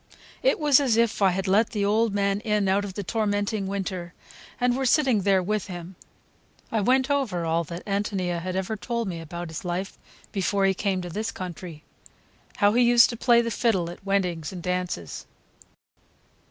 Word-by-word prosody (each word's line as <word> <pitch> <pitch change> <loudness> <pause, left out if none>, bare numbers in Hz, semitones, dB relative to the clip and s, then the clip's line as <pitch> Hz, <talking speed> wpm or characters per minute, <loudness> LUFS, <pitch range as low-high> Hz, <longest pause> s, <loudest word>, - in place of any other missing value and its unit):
It - - +2
was 295 -3 +5
as 255 -6 +2
if 230 -2 +1
I 195 - +6
had 190 +2 -2
let 210 +4 +3
the 205 -2 -1
old 220 +2 +2
man 200 0 0
in 210 -2 0
out 195 +2 +2
of 195 -2 -6
the 205 - -3
tormenting 205 0 -1
winter, 185 -3 -4 0.4
and 245 0 +2
were 265 - -1
sitting 260 -6 +3
there 190 -1 +3
with 210 +2 -1
him. 175 0 -8 0.8
I 220 - +1
went 260 +5 +2
over 225 -12 0
all 165 +1 +1
that 170 +3 -8
Ántonia 195 -4 -1
had 185 +1 -4
ever 190 +3 -2
told 235 +3 -3
me 170 -3 -4
about 170 +1 -6
his 160 +3 -6
life 180 +2 -4 0.3
before 195 0 +1
he 195 - +3
came 190 -1 -1
to 175 - -6
this 215 +6 -3
country; 175 -3 -8 0.7
how 205 0 +4
he 245 - +4
used 240 +1 +6
to - - -5
play 235 0 +4
the 230 0 -3
fiddle 190 -8 +1
at 175 - -12
weddings 180 -6 -1
and 180 -3 -8
dances. 180 - -3
200 Hz, 190 wpm, -25 LUFS, 180-225 Hz, 0.8 s, I